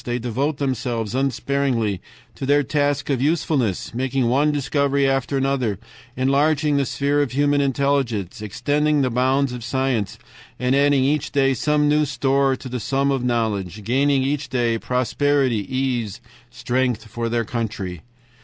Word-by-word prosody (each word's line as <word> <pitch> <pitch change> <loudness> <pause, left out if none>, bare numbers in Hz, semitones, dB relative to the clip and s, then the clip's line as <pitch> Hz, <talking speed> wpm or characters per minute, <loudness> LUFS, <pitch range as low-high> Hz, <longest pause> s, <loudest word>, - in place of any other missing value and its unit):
They 120 0 -2
devote 130 +5 -2
themselves 125 -5 -2
unsparingly 130 -5 0 0.3
to 135 - -6
their 145 +1 +4
task 145 +1 0
of 130 -3 0
usefulness, 145 - 0
making 130 0 0
one 145 +4 +3
discovery 140 -1 +1
after 135 +1 0
another, 130 -6 0 0.4
enlarging 145 +3 +2
the 140 -2 +1
sphere 145 +1 +1
of 140 -3 -2
human 145 +1 +2
intelligence, 135 -7 0
extending 145 +8 0
the 130 - 0
bounds 130 +2 +1
of 120 -2 -6
science, 125 -4 -1 0.4
adding 135 +2 +3
each 145 +1 0
day 135 -1 +2
some 150 +4 +1
new 150 +1 +3
store 135 -1 +1
to 130 - -9
the 125 0 -4
sum 135 +5 0
of 135 -3 -1
knowledge, 105 -5 -1
gaining 135 +4 +2
each 140 +1 -2
day 120 -3 0
prosperity, 130 -2 0
ease, 125 -6 -1 0.3
strength 120 -1 -1
for 115 +2 -4
their 115 0 0
country. 105 -7 -4
135 Hz, 145 wpm, -22 LUFS, 120-140 Hz, 0.4 s, their